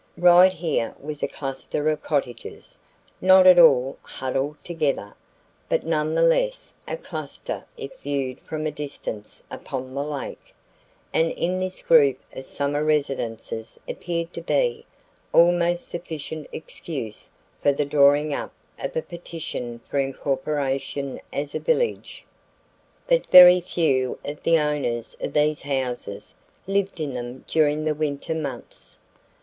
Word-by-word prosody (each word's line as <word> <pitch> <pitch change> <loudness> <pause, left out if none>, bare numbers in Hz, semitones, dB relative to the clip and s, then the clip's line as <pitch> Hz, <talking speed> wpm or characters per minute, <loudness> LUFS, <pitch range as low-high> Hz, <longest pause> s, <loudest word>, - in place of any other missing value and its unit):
Right 180 +1 +7
here 160 -10 -2
was 150 +1 -7
a - - +1
cluster 135 +2 -4
of 155 -1 +1
cottages, 130 -6 -4 0.5
not 185 0 +7
at 180 -1 +9
all 135 -5 +5
huddled 135 +3 -3
together, 150 -11 -2 0.6
but - - 0
none 155 -1 0
the 165 - +3
less - - +1
a - - -3
cluster - - -6
if 440 -12 -8
viewed 135 -3 -3
from 155 -1 -5
a 155 - 0
distance 140 -8 -6
upon 130 0 -6
the 140 +1 -2
lake, 145 -2 -7 0.6
and 165 0 +3
in 180 +2 -1
this 185 0 -2
group 140 -5 +5 0.2
of 130 - -8
summer 145 +2 -1
residences 135 -7 -2
appeared 170 -1 -4
to 170 - -6
be 465 - 0 0.5
almost 175 0 +4
sufficient 160 -2 -6
excuse 135 -9 -6 0.3
for 145 - +4
the 140 +1 -1
drawing 145 +1 +4
up - - -4 0.3
of 135 - -5
a 160 - 0
petition 155 -9 -6
for 140 - -1
incorporation 135 0 -2
as 145 0 -3
a - - -2
village. 485 -1 -1 0.8
But - - +2
very 180 0 +10
few 135 -8 0
of 145 +1 -6
the 165 0 +4
owners 145 -6 -1
of - - -3
these 150 0 +2
houses 125 -7 -4 0.3
lived 195 -1 -1
in 145 -4 -3
them 125 +1 -6
during 155 -1 +2
the 155 - +2
winter 150 0 -2
months. 140 -6 -7
150 Hz, 135 wpm, -24 LUFS, 135-170 Hz, 0.8 s, very